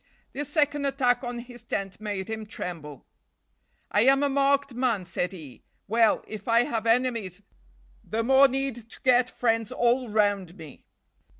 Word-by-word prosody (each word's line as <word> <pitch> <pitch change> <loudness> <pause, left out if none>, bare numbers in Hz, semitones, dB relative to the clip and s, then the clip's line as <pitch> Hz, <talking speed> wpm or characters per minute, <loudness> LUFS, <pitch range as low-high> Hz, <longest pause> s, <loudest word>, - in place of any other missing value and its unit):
This 290 +1 -3
second 290 -1 +1
attack 255 -2 +1
on 245 0 -4
his 240 0 -10
tent 195 -3 -4
made 205 -3 -4
him 220 -1 -5
tremble. 160 - -7 0.9
"I 205 - +3
am 270 +4 +4
a 285 - +2
marked 280 0 +1
man," 235 -6 0
said 180 +1 -2
he. 155 -9 -11 0.3
"Well, 225 +1 +3
if 215 +3 -8
I 230 +1 +4
have 230 -2 -3
enemies, 225 -6 0 0.6
the 225 +1 -2
more 270 +3 +6
need 265 -4 -3
to - - -13
get 250 -1 +4
friends 225 -3 0
all 240 +1 +1
round 205 -4 0
me." 155 -4 -13
235 Hz, 160 wpm, -26 LUFS, 205-260 Hz, 0.9 s, more